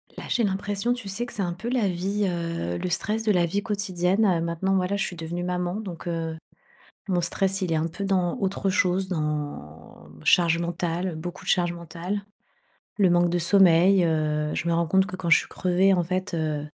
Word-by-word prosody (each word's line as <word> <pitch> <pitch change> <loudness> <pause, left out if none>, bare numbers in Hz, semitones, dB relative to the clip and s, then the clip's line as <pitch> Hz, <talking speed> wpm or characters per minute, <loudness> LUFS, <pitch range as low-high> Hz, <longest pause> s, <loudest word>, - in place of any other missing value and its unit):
Là, - - -8
j'ai 240 - +1
l'impression, 200 +3 -1
tu 245 -4 -7
sais 210 +5 -2
que 245 - -9
c'est 205 - -2
un 175 -2 -1
peu 190 +7 -6
la 245 -5 +1
vie, 195 +4 -1
heu, 170 - -3
le 180 - -3
stress 215 +5 -1
de 220 - +2
la 180 -3 +3
vie 200 +5 -1
quotidienne, 200 -1 0
heu. 180 -4 +3
Maintenant, 170 +3 -1
moi 185 -1 +2
là, 200 - -1
je 200 - 0
suis 180 - -4
devenue 170 +1 -5
maman, 180 0 -2
donc, 190 -6 -7
heu, 165 -1 -3 0.7
mon 180 -1 +2
stress, 195 +3 0
il 180 -3 -1
est - - +2
un 160 +1 0
peu 175 +4 -6
dans 185 -3 0
autre 195 0 -1
chose. 185 0 +2
Dans 145 - -5 0.2
charge 170 - +4
mentale, 170 +1 -2
heu, 165 - -6
beaucoup 175 +3 -7
de - - -4
charge 175 -2 +2
mentale, 170 +4 -5 0.8
le 190 -3 +4
manque 175 0 +3
de 175 - +1
sommeil, 180 +1 +5
heu, 150 -2 0
je 170 - -2
me - - +2
rends 170 0 +1
compte 190 +4 +3
que 185 - -6
quand 175 -2 -3
je - - +8
suis - - -6
crevée, 185 +2 +2
en 180 - +2
fait, 185 +1 -3
heu, 155 -2 -2
180 Hz, 220 wpm, -25 LUFS, 170-195 Hz, 0.8 s, je